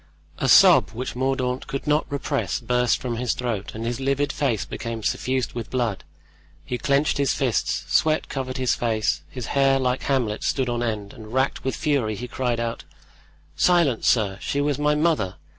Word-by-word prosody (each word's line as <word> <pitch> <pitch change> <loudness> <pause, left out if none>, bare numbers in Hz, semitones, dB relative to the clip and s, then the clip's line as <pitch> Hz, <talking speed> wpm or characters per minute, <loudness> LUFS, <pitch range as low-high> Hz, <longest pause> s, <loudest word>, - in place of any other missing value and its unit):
A - - 0
sob - - +7
which 125 +3 -5
Mordaunt 130 0 -1
could 135 - -4
not 150 0 +1
repress 140 - -1
burst 125 -1 +1
from 120 -2 -3
his 120 -1 -1
throat 115 -6 -3
and 115 +1 -5
his 120 +1 -2
livid 140 +1 0
face 130 -8 0
became 115 -1 -5
suffused 130 +2 -1
with 120 -3 -5
blood; 120 -6 -1 0.6
he 125 - -3
clenched 140 +4 +1
his 140 -1 +2
fists, 125 -6 0
sweat 155 0 +2
covered 130 -1 -4
his 130 -1 +1
face, 110 -10 0
his 125 -3 -6
hair, 135 -1 +4
like 125 -1 0
Hamlet's, 125 -6 -1
stood 130 -3 0
on 120 0 -1
end, 110 -4 -3
and 110 -3 -11
racked 130 +2 0
with 130 - -1
fury 130 -8 0
he 125 +4 -6
cried 120 -1 -2
out: 115 0 -3 0.7
"Silence, 170 -10 +3
sir! 100 -4 +2
she 140 - -2
was 145 -1 0
my 150 0 +2
mother! 150 - +1
125 Hz, 180 wpm, -24 LUFS, 115-140 Hz, 0.7 s, sob